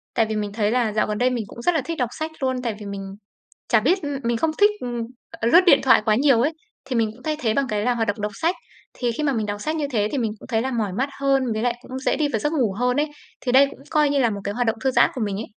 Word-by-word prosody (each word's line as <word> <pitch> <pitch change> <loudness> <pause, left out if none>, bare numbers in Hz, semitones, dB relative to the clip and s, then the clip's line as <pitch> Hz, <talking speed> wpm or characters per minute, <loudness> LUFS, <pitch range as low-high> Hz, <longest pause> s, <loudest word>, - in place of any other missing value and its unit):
tại 225 - +3
vì 220 0 -3
mình 205 -1 -3
thấy 210 -1 0
là 235 -3 +1
dạo 215 - +1
gần 210 0 -2
đây 250 +2 +3
mình 245 -3 -2
cũng 235 - -10
rất 355 +7 +2
là 315 - +2
thích 330 +5 -5
đọc 250 -3 0
sách 315 +1 -3
luôn, 260 -1 0
tại 230 -4 -2
vì 210 - -8
mình 200 -1 -5 0.7
chả 225 - +4
biết, 350 - +2
ừm 285 -1 -3
mình 235 0 +1
không 315 +8 +1
thích, 415 +1 +6
ừm, 240 -1 -4 0.5
lướt 345 - +9
điện 280 -6 +7
thoại 260 -4 +5
quá 215 -1 +3
nhiều 265 0 +4
ấy, 290 +7 +2 0.3
thì 260 -2 -3
mình 225 -2 +1
cũng 245 +3 -17
thay 310 +1 -1
thế 220 -6 +1
bằng 275 +2 +1
cái 210 -2 -1
là 245 +2 +1
hoạt 225 -2 -1
động 205 +1 -1
đọc 210 0 -2
sách. 330 - 0 0.4
Thì 240 -2 -1
khi 265 - -4
mà 290 -2 +2
mình 220 -4 -1
đọc 205 0 -4
sách 310 +7 -2
như 300 -2 -1
thế 210 -5 +1
thì 280 - -1
mình 225 -4 -1
cũng - - -13
thấy 225 -3 +1
là 265 - -2
mỏi 220 -6 -1
mắt 265 +3 +1
hơn, 270 -3 +2
với 215 0 -2
lại 245 -1 +1
cũng 260 +1 -7
dễ 265 - 0
đi 300 -1 +1
vào 225 - -1
giấc 295 +8 -1
ngủ 250 -10 +1
hơn 250 +1 +1
ấy. 300 - +1 0.3
Thì 250 - -2
đây 270 +2 +7
cũng - - -13
coi 300 -2 +3
như 285 - +1
là 240 -4 +3
một 200 -1 -4
cái 205 - -3
hoạt 245 +1 0
động 225 - +1
thư 265 - +3
giãn - - +4
của 255 - -5
mình 200 -2 -2
ấy. 220 - -5
245 Hz, 325 wpm, -23 LUFS, 220-275 Hz, 0.7 s, lướt